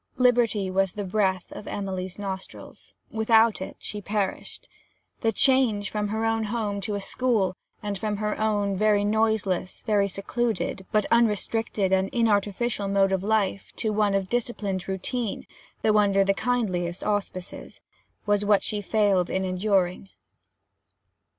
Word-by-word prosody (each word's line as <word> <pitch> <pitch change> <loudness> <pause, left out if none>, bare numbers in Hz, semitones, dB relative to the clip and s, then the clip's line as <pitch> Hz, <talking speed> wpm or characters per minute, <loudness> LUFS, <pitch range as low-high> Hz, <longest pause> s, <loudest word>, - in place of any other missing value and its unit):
Liberty 235 -6 +2
was 190 -1 +1
the 205 - -4
breath 190 -2 0
of - - -9
Emily's 185 -2 -4
nostrils; 195 -2 -7 0.2
without 220 -1 +3
it, 190 - -6
she 210 - -6
perished. 205 -1 -3 0.5
The 225 - +1
change 235 -5 +3
from 210 -1 -1
her 220 +2 -1
own 225 0 +1
home 210 -2 -2
to 205 +1 -3
a - - -2
school, 200 -3 0 0.3
and 205 -1 -2
from 210 0 -2
her 210 0 -1
own 205 -2 +1
very 205 0 +3
noiseless, 215 -4 0
very 205 -3 +2
secluded, 200 -1 -2
but 210 -1 +2
unrestricted 220 -3 +1
and 190 0 +2
inartificial 210 -1 +1
mode 195 -1 +3
of 190 -1 0
life, 205 -2 0
to 215 -1 -1
one 205 -1 +2
of 195 -1 0
disciplined 205 -5 -2
routine 200 +4 -3 0.4
(though 215 -1 +4
under 200 -1 +4
the 195 0 +2
kindliest 190 -7 -1
auspices), 200 -3 -4 0.5
was 205 0 +2
what 205 -1 +3
she 210 -1 -2
failed 200 -3 +2
in 190 0 -1
enduring. 185 0 0
205 Hz, 145 wpm, -26 LUFS, 195-220 Hz, 0.5 s, though